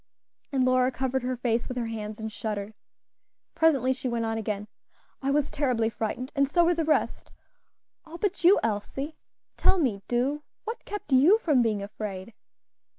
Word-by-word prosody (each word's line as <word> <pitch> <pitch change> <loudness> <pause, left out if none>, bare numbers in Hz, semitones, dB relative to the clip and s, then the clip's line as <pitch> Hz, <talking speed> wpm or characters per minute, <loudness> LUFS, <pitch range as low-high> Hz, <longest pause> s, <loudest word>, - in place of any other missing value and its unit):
And 265 -2 +2
Lora 255 0 +3
covered 265 0 -1
her 250 +1 -2
face 235 -1 0
with 255 - -5
her 240 - -1
hands 215 -1 -5
and 220 0 -4
shuddered. 210 -1 -4 0.8
Presently 275 -6 +3
she 255 0 -4
went 235 -1 -1
on 225 0 -1
again. 210 -2 -3 0.5
"I 270 - -1
was 285 0 +1
terribly 250 -6 +1
frightened, 245 +5 -3
and 275 -1 +2
so 345 +3 +4
were 350 - +4
the 330 -1 0
rest 310 0 0 0.7
all 330 +1 -10
but 390 -1 -2
you, 370 +4 +7
Elsie; 225 +8 -2 0.4
tell - - +4
me, 240 - 0
do 260 +5 0 0.2
what 455 +2 -6
kept 415 -7 -6
you 300 +12 +7
from 300 - +3
being 215 -4 0
afraid?" 205 0 -6
255 Hz, 170 wpm, -27 LUFS, 225-295 Hz, 0.8 s, you